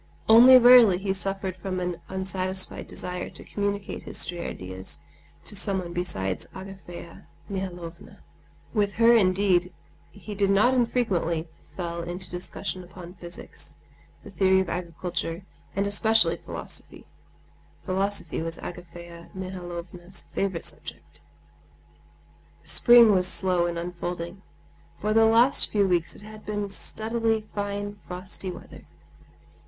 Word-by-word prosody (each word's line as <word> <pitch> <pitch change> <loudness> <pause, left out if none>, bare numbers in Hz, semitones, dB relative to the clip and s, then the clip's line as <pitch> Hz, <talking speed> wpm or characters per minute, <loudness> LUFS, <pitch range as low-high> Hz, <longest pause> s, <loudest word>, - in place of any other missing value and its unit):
Only 245 +4 +10
rarely 245 -6 +8
he 195 +1 -1
suffered 195 -1 -2
from 185 0 -3
an 180 -1 -3
unsatisfied 190 0 -2
desire 180 0 -5
to - - -10
communicate 200 -1 -3
his - - -7
stray 175 -1 -2
ideas 95 -4 -7 0.5
to 210 - -3
someone 190 -3 -2
besides 95 - -2
Agafea 190 -1 -10 0.2
Mihalovna. 180 -4 -7 0.5
With 205 -3 +1
her 230 +2 +6
indeed 185 -3 +3 0.4
he 210 +1 -9
not 200 +4 +3
infrequently 195 -10 0 0.3
fell 170 -2 -3
into 175 +1 -4
discussion 185 +1 -5
upon 180 0 -11
physics, 175 -1 -9 0.5
the - - -11
theory 190 -1 +3
of 190 - -1
agriculture, 175 0 -4 0.3
and 200 +1 +1
especially 220 +2 +3
philosophy; - - -7 0.8
philosophy 190 -4 -1
was 165 +1 -4
Agafea 170 -1 -10
Mihalovna's 180 -1 -7
favorite 190 -4 -1
subject. - - -5 1.4
Spring 240 -2 +7
was 185 -2 +4
slow 180 -2 +2
in 170 -1 -3
unfolding. 175 +1 -5 0.6
For 215 +1 0
the 225 0 +6
last 230 +4 +5
few 200 -2 +3
weeks 175 -2 0
it - - -10
had 215 0 -11
been 205 -1 -3
steadily 225 +2 -1
fine 205 0 -4
frosty 185 +1 -4
weather. 180 - -11
190 Hz, 120 wpm, -26 LUFS, 175-205 Hz, 1.4 s, Only